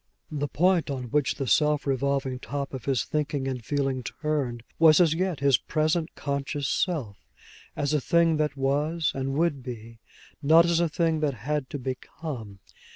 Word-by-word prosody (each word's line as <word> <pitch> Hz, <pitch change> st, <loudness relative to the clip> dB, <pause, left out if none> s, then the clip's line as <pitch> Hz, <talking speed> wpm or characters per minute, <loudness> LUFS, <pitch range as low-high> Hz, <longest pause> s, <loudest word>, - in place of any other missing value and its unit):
The 145 Hz, -1 st, -2 dB
point 175 Hz, +1 st, +2 dB
on 130 Hz, -4 st, -4 dB
which 145 Hz, -2 st, +1 dB
the 135 Hz, -, -3 dB
swift 150 Hz, +3 st, +2 dB
revolving 135 Hz, -1 st, 0 dB
top 140 Hz, +1 st, -5 dB
of 130 Hz, -2 st, -6 dB
his 135 Hz, -3 st, +1 dB
thinking 145 Hz, -3 st, -2 dB
and 130 Hz, -3 st, -4 dB
feeling 135 Hz, 0 st, -1 dB
turned 130 Hz, -3 st, -3 dB, 0.2 s
was 160 Hz, 0 st, +7 dB
as 165 Hz, -3 st, +5 dB
yet 180 Hz, -3 st, -1 dB
his 140 Hz, -3 st, +4 dB
present 155 Hz, +1 st, -1 dB
conscious 140 Hz, 0 st, -2 dB
self, 140 Hz, -, -2 dB, 0.5 s
as 145 Hz, +1 st, -1 dB
a 150 Hz, -, +2 dB
thing 170 Hz, +1 st, +3 dB
that 150 Hz, -2 st, -1 dB
was 150 Hz, +4 st, 0 dB
and 135 Hz, 0 st, -2 dB
would 155 Hz, -3 st, +1 dB
be, 115 Hz, -2 st, -8 dB, 0.4 s
not 160 Hz, +3 st, +6 dB
as 170 Hz, -1 st, +2 dB
a 170 Hz, -1 st, +2 dB
thing 160 Hz, 0 st, +1 dB
that 145 Hz, -4 st, 0 dB
had 150 Hz, -2 st, -1 dB
to -, -, -4 dB
become. 130 Hz, -4 st, -6 dB
145 Hz, 170 wpm, -26 LUFS, 135-155 Hz, 0.5 s, was